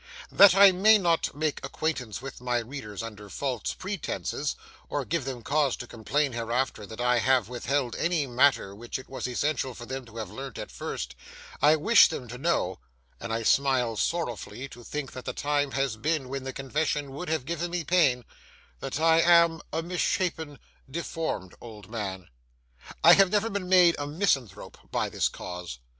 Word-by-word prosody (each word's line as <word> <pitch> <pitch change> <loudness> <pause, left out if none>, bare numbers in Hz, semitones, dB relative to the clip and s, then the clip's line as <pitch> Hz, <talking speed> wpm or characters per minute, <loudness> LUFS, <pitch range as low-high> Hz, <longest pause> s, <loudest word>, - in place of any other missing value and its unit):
That 195 -2 +8
I 200 0 +9
may 210 +4 +6
not 170 -4 +1
make 155 0 -2
acquaintance 135 -5 -3
with 135 -2 -8
my 125 -1 0
readers 115 -3 -6
under 105 -2 -9
false 130 +1 -3
pretences, 190 -2 -3 0.3
or - - -2
give - - -2
them 130 -3 -5
cause 145 0 +1
to - - -8
complain 135 +5 -1
hereafter 115 -2 -2
that 110 +1 -10
I 125 0 +3
have 125 -2 +2
withheld 125 +1 -1
any 170 -3 +1
matter 130 -5 +2
which 115 +4 -6
it 130 - -11
was 130 -1 -4
essential 130 0 -1
for 120 - -9
them 130 +1 -5
to 115 0 -13
have 110 -4 -5
learnt 135 +2 -7
at - - -7
first, - - -5 0.5
I 150 +2 +6
wish 220 +10 +6
them 130 -6 -6
to 125 +2 -8
know—and 90 - -3
I 115 0 -1
smile 130 -2 +2
sorrowfully 130 -2 -3
to 120 - -12
think 150 +1 -5
that 130 - -9
the 125 - -3
time 145 +1 0
has 135 -4 -1
been 150 +1 -1
when 135 0 -5
the 135 - -3
confession 140 +1 -2
would 155 +6 -6
have 160 -5 -1
given 170 +2 -3
me 175 -1 -2
pain—that 130 - -2
I 165 0 +5
am 170 -2 +5
a 160 +2 -2
misshapen, 170 -3 -1 0.3
deformed 160 - -4
old 110 -3 -11
man. 95 -6 -5 0.8
I 170 - +10
have 195 0 +6
never 210 +3 +1
been 195 -2 -3
made 180 -2 +6
a 145 - -3
misanthrope 140 - -1
by - - -1
this - - 0
cause. 90 -7 -7
135 Hz, 175 wpm, -27 LUFS, 120-160 Hz, 0.8 s, I